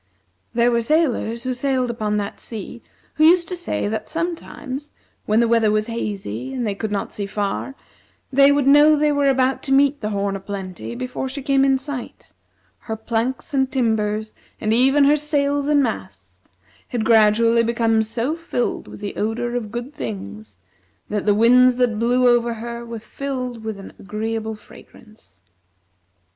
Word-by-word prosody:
There 240 +1 +3
were 235 0 +2
sailors 235 -4 0
who 255 0 -1
sailed 255 -1 0
upon 215 -2 -2
that 205 -1 -4
sea 225 +1 -8 0.3
who 305 - +1
used 340 +1 +5
to 365 - -3
say 345 -10 -3
that 215 0 -4
sometimes, 305 -4 -5 0.4
when 215 +1 +3
the 235 - +3
weather 230 -2 +3
was 215 0 +1
hazy 195 - -4
and 245 - -2
they 205 - -1
could 210 +2 -4
not 200 -1 -3
see 200 -1 -4
far, 205 +6 -3 0.6
they 275 +1 +6
would 285 -1 +2
know 295 +2 +7
they 300 0 +2
were 285 -1 +2
about 260 0 +1
to 270 - -4
meet 280 +1 +3
the 210 - -2
"Horn 200 -1 -1
o' - - -4
Plenty" 195 +2 -6
before 255 +1 -4
she 275 +1 -6
came 275 -1 +3
in 270 -1 +4
sight; 265 -2 -7 0.5
her 220 -2 -5
planks 230 +5 -3
and 265 -1 +1
timbers, 220 -3 0 0.3
and 215 0 0
even 270 +4 +4
her 290 +2 +5
sails 285 -1 0
and 295 -1 +4
masts, 225 -4 -6 0.4
had 235 -3 -2
gradually 230 +1 +5
become 230 -1 +2
so 230 +7 -2
filled 330 -7 -3
with - - -11
the 205 - -5
odor 235 +3 -2
of 220 -4 -3
good 240 +5 -5
things 105 -3 -7 0.5
that 210 0 -2
the 205 - +4
winds 250 +3 +5
that 240 -4 +1
blew 245 +2 +3
over 240 -1 +3
her 235 +1 -6
were 235 -1 -7
filled 250 0 -5
with 220 -2 -5
an 195 - -10
agreeable 220 +2 -4
fragrance. 215 - -17
235 Hz, 175 wpm, -21 LUFS, 215-270 Hz, 0.6 s, know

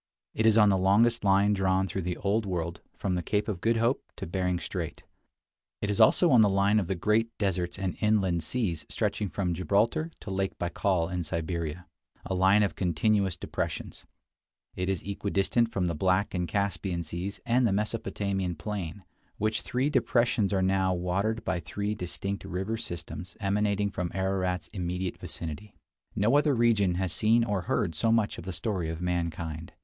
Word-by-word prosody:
It 110 - +2
is 110 0 +5
on 105 -2 +7
the 95 -1 +3
longest 110 +5 +3
line 100 +1 +4
drawn 95 -1 +1
through 95 +2 -3
the 90 0 -3
Old 105 +3 +1
World 85 -2 -3 0.2
from 95 - -1
the 90 - 0
Cape 105 +6 -1
of 100 -5 -3
Good 115 0 +2
Hope 115 +4 +2
to - - -6
Bering 90 0 -1
Strait; - - -5 0.8
it 105 - -1
is 105 - +1
also 165 +9 +6
on 120 -3 +7
the 105 - +5
line 100 +2 +3
of 95 - -2
the 95 - -1
great 110 +5 +2
deserts 90 -3 -1
and 95 -2 -2
inland 100 -6 +2
seas 85 -3 -1
stretching 105 - -1
from 90 -3 -1
Gibraltar 105 - +1
to 100 - -6
Lake 95 0 -2
Baikal 90 -1 0
in 90 - -1
Siberia 85 +1 -3 0.2
— - - -32
a - - -2
line 95 +3 +4
of 100 - 0
continuous 95 +1 +1
depressions; - - -4 0.7
it 90 +1 -2
is 95 -3 -1
equidistant 100 +3 0
from 95 -2 0
the 85 - 0
Black 95 +5 +1
and 90 -2 -1
Caspian 95 -3 -1
Seas 85 +5 -5
and 120 +1 +3
the - - +1
Mesopotamian 100 -3 -1
plain, 95 0 -5 0.3
which 110 +1 0
three 130 +4 -1
depressions 120 -5 +2
are 95 -2 +2
now 95 -1 +2
watered 100 +6 -1
by 95 -2 0
three 100 +5 -3
distinct 100 +1 -4
river 95 +5 -3
systems 85 -4 -7
emanating 100 0 +1
from 90 -2 -2
Ararat's 95 -1 -1
immediate 90 -1 -3
vicinity. 85 +6 -7 0.4
No 110 +7 +3
other 145 -2 +3
region 110 -6 +3
has 90 -2 -1
seen 115 +6 +3
or 105 -4 -1
heard 80 - +1
so 110 +9 +1
much 115 -2 +1
of - - -9
the 95 - -3
story 95 -4 -2
of 80 0 -4
mankind. 85 -2 -3
95 Hz, 180 wpm, -28 LUFS, 90-105 Hz, 0.8 s, on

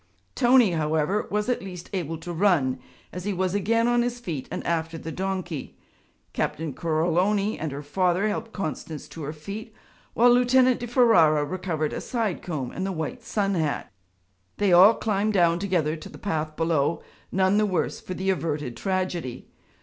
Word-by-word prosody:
Tony 245 -5 +5
however 160 +5 0
was 210 +1 -1
at 250 - 0
least 180 -3 -8
able 165 -4 -2
to 175 +2 -7
run, 165 -8 +2 0.3
as 180 - -5
he 205 - -1
was 185 0 -1
again 230 +4 +2
on 240 0 +3
his 245 0 -2
feet 165 - -5
and - - -5
after 165 -1 -1
the 160 0 -6
donkey. 185 -5 -4 0.6
Captain 155 -2 -2
Coroloni 180 - +1
and 155 -2 -3
her 140 +2 -6
father 180 +6 +1
helped 220 +2 -3
Constance 160 -5 -5
to 165 - -10
her 145 0 -4
feet 200 +8 -8 0.4
while 240 +1 +6
Lieutenant 250 +1 +4
di 240 - -5
Ferara 175 - +4
recovered 160 -2 -2
a - - -4
side 225 -7 -2
comb 145 -8 -4
and 185 - -4
the 195 - -1
white 190 +9 -4
sun 205 -3 -1
hat. 155 - -1 0.7
They 200 -3 +3
all 195 +6 +8
climbed 215 0 0
down 170 -3 +3
together 175 -5 0
to 155 - -10
the - - -11
path 155 -5 -3
below, 165 -1 0 0.3
none 190 +2 +3
the 210 - +2
worse 185 -5 -1
for 185 - -6
the 190 +2 0
averted 150 -8 -2
tragedy. 185 -9 -3
185 Hz, 175 wpm, -25 LUFS, 160-210 Hz, 0.7 s, all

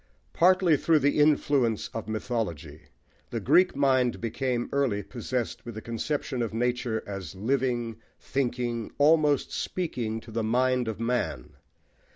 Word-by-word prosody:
Partly 180 -2 +4
through 160 +3 +3
the 145 0 +2
influence 145 -6 +2
of 110 -2 -6
mythology, 95 - -4 0.4
the - - -3
Greek 185 -3 +4
mind 130 -3 +2
became 120 +1 -2
early 130 -8 +1
possessed 120 +3 -4
with 120 -2 -8
the 110 - -6
conception 125 +2 -2
of 110 -2 -3
nature 120 -1 -1
as 95 -4 -6
living, 120 +1 -1 0.2
thinking, 120 -3 -2
almost 150 -1 +3
speaking 120 -11 -3
to 115 +1 -13
the 115 +1 -1
mind 125 +2 +1
of 110 -2 -4
man. 115 -10 -2
120 Hz, 135 wpm, -27 LUFS, 110-140 Hz, 0.4 s, Partly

